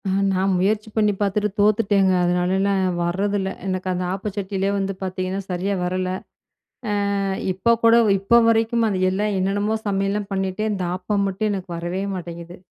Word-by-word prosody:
அ, -, -, 0 dB, 0.2 s
நான் 190 Hz, +1 st, +1 dB
முயற்சி 210 Hz, +3 st, 0 dB
பண்ணி 210 Hz, -2 st, +3 dB
பாத்துட்டு 205 Hz, +1 st, 0 dB
தோத்துட்டேங்க. 205 Hz, -2 st, +3 dB
அதனால 180 Hz, +1 st, +1 dB
நான் 190 Hz, -2 st, +1 dB
வரதில்ல. 195 Hz, +3 st, 0 dB, 0.2 s
எனக்கு 185 Hz, -1 st, -2 dB
அந்த 180 Hz, 0 st, -2 dB
ஆப்ப 200 Hz, +2 st, -4 dB
சட்டிலேயே 195 Hz, -1 st, -1 dB
வந்து 195 Hz, 0 st, -1 dB
பாத்தீங்கன்னா 185 Hz, +1 st, -3 dB
சரியா 185 Hz, +2 st, -1 dB
வரல. 185 Hz, +1 st, -1 dB, 1.1 s
அ -, -, 0 dB, 0.3 s
இப்போ 190 Hz, +6 st, 0 dB
கூட 230 Hz, 0 st, +7 dB, 0.2 s
இப்போ 200 Hz, +5 st, +4 dB
வரைக்கும், 230 Hz, +1 st, +2 dB
அது 195 Hz, -3 st, -1 dB
எல்லாம் 205 Hz, +2 st, -1 dB
என்னென்னமோ 205 Hz, +3 st, 0 dB
சமையல்லாம் 195 Hz, 0 st, -1 dB
பண்ணிட்டேன். 195 Hz, +2 st, -1 dB
இந்த 190 Hz, -3 st, -2 dB
ஆப்பம் 200 Hz, +2 st, -1 dB
மட்டும் 195 Hz, +3 st, -1 dB
எனக்கு 190 Hz, -2 st, -5 dB
வரவே 175 Hz, +3 st, -3 dB
மாட்டேங்குது. 170 Hz, -1 st, -7 dB
195 Hz, 155 wpm, -22 LUFS, 185-205 Hz, 1.1 s, கூட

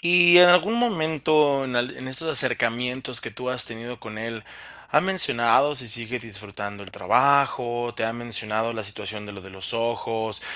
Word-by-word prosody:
Y 175 Hz, 0 st, +6 dB
en 180 Hz, 0 st, +9 dB
algún 180 Hz, +5 st, +4 dB
momento, 155 Hz, -, +1 dB
en 130 Hz, -2 st, -5 dB
al 120 Hz, +1 st, -2 dB
en 130 Hz, -, -8 dB
estos 135 Hz, +5 st, -3 dB
acercamientos 125 Hz, -1 st, -1 dB
que -, -, -7 dB
tú 125 Hz, -, -7 dB
has 125 Hz, -1 st, +4 dB
tenido 120 Hz, +1 st, -7 dB
con 110 Hz, -1 st, -10 dB
él, 115 Hz, -1 st, -6 dB, 0.5 s
¿ha -, -, +4 dB
mencionado 145 Hz, -7 st, +2 dB
si 125 Hz, -3 st, +2 dB
sigue 115 Hz, +2 st, +1 dB
disfrutando 100 Hz, -2 st, -8 dB
el 95 Hz, -, -12 dB
trabajo, 120 Hz, +2 st, +1 dB
te -, -, -2 dB
ha 115 Hz, -, -2 dB
mencionado 115 Hz, -1 st, -3 dB
la 110 Hz, -, -5 dB
situación 105 Hz, +1 st, -7 dB
de 105 Hz, -, -9 dB
lo 100 Hz, -, -11 dB
de 95 Hz, -, -13 dB
los 95 Hz, -1 st, -4 dB
ojos? 115 Hz, -2 st, -3 dB
120 Hz, 180 wpm, -23 LUFS, 110-140 Hz, 0.5 s, en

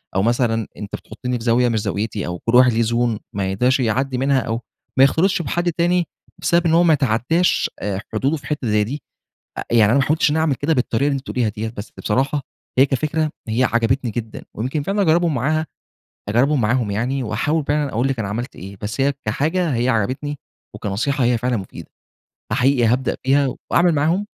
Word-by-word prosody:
أو 95 Hz, -, +3 dB
مثلًا 115 Hz, -1 st, +1 dB
أنت 105 Hz, 0 st, -6 dB
بتحطني 125 Hz, +3 st, -5 dB
في -, -, -8 dB
زاوية 120 Hz, +1 st, +3 dB
مش 115 Hz, -2 st, 0 dB
زاويتي 105 Hz, 0 st, -2 dB
أو 90 Hz, 0 st, -4 dB
كل 115 Hz, -, 0 dB
واحد 125 Hz, -1 st, +6 dB
ليه 115 Hz, +1 st, +2 dB
Zone 115 Hz, -1 st, 0 dB
ما 95 Hz, -1 st, -1 dB
يقدرش 125 Hz, +7 st, +2 dB
يعدّي 130 Hz, +2 st, 0 dB
منها 135 Hz, +1 st, +2 dB
أو 115 Hz, -1 st, -2 dB, 0.4 s
ما 130 Hz, -, +7 dB
يختلطش 170 Hz, +7 st, +3 dB
بحد 175 Hz, +4 st, -1 dB
تاني 175 Hz, +1 st, +1 dB, 0.3 s
بسبب 170 Hz, 0 st, +2 dB
إن 165 Hz, -, +3 dB
هو 170 Hz, +1 st, +5 dB
ما 165 Hz, -2 st, +5 dB
يتعدّاش 140 Hz, +6 st, +1 dB
آآ، 100 Hz, -1 st, -3 dB
حدوده 135 Hz, +8 st, 0 dB
في 145 Hz, -, -11 dB
حتّة 145 Hz, -5 st, -2 dB
زي 105 Hz, -1 st, +2 dB
دي. 135 Hz, +7 st, -5 dB, 0.6 s
آآ، -, -, -3 dB
يعني 110 Hz, -3 st, +5 dB
أنا 140 Hz, -, +4 dB
ما -, -, +4 dB
حاولتش 155 Hz, +1 st, +2 dB
إن 145 Hz, -, 0 dB
أنا -, -, +2 dB
أعمل 155 Hz, -4 st, +1 dB
كده 145 Hz, +5 st, 0 dB
بالطريقة 130 Hz, 0 st, +1 dB
اللي 145 Hz, -, +1 dB
أنتِ -, -, -6 dB
بتقوليها 120 Hz, -4 st, 0 dB
دي، 110 Hz, +2 st, -4 dB
بس 110 Hz, -1 st, -8 dB
بصراحة 135 Hz, +6 st, 0 dB, 0.4 s
هي 135 Hz, -, +7 dB
كفكرة، 155 Hz, +3 st, -1 dB, 0.2 s
هي 115 Hz, +3 st, +1 dB
عجبتني 120 Hz, 0 st, +1 dB
جدًا 110 Hz, 0 st, -5 dB
ويمكن 130 Hz, +7 st, -2 dB
فعلًا 200 Hz, +5 st, 0 dB
أجربهم 170 Hz, -2 st, +3 dB
معاها 155 Hz, +5 st, 0 dB, 0.6 s
أجربهم 130 Hz, +7 st, +2 dB
معاهم 115 Hz, 0 st, +1 dB
يعني 125 Hz, +7 st, -1 dB
واحاول 150 Hz, +7 st, -1 dB
فعلًا 145 Hz, 0 st, +1 dB
أقول 120 Hz, +5 st, +1 dB
لِك 135 Hz, -2 st, -2 dB
أنا 105 Hz, -3 st, -2 dB
عملت 120 Hz, +5 st, -4 dB
إيه. 95 Hz, +2 st, -9 dB
بس 105 Hz, +4 st, -4 dB
هي 140 Hz, +1 st, +3 dB
كحاجة 155 Hz, -, 0 dB
هي 120 Hz, +2 st, 0 dB
عجبتني، 130 Hz, +6 st, -1 dB, 0.4 s
وكنصيحة 120 Hz, +7 st, -1 dB
هي 120 Hz, 0 st, +2 dB
فعلًا 125 Hz, +1 st, 0 dB
مفيدة. 95 Hz, -3 st, -8 dB, 0.6 s
فحقيقي 130 Hz, -2 st, +3 dB
هابدأ 125 Hz, +3 st, +1 dB
بيها 135 Hz, 0 st, +2 dB, 0.2 s
وأعمل 175 Hz, 0 st, +4 dB
معاهم 165 Hz, +8 st, +1 dB
130 Hz, 200 wpm, -20 LUFS, 115-145 Hz, 0.6 s, ما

